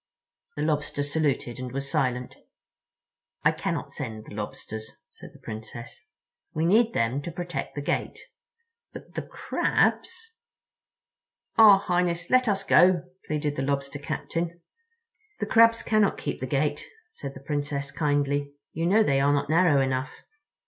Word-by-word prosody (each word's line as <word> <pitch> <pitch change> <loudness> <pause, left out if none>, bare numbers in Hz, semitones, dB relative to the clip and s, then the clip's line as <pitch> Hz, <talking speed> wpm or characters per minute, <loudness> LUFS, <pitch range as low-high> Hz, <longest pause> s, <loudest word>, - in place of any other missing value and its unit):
The 150 - -2
Lobster 150 -2 -1
saluted 145 -5 -1
and 125 -1 -5
was 135 +2 -4
silent. 125 -2 -1 1.1
"I - - +5
cannot - - -3
send 110 -1 -6
the - - -11
Lobsters," 110 +1 -6 0.2
said - - -11
the - - -17
Princess, 115 +7 -8 0.5
"we 160 +1 +1
need 225 +6 +4
them 115 +5 +1
to 170 - -6
protect 175 +1 -5
the 145 - -4
gate. - - -2 0.8
But - - -11
the - - -3
Crabs—" 455 0 -1 1.2
"Ah, 215 -3 +9
Highness, 175 -2 -1
let 255 -1 +4
us 195 -2 +1
go," 180 -2 +5 0.2
pleaded 150 -1 -1
the - - 0
Lobster 140 +1 -2
Captain. 170 +4 -3 0.8
"The - - -1
Crabs 230 -1 +5
cannot 215 -2 +2
keep - - -4
the 130 - -4
gate," 145 +3 0 0.3
said 140 - -8
the - - -8
Princess 145 -2 -2
kindly. 145 -2 0 0.2
"You 165 +1 -1
know 215 +4 +5
they 140 -9 +2
are 140 +1 +4
not 145 +1 0
narrow 165 -4 +4
enough. 130 0 -1
145 Hz, 145 wpm, -26 LUFS, 135-175 Hz, 1.2 s, Ah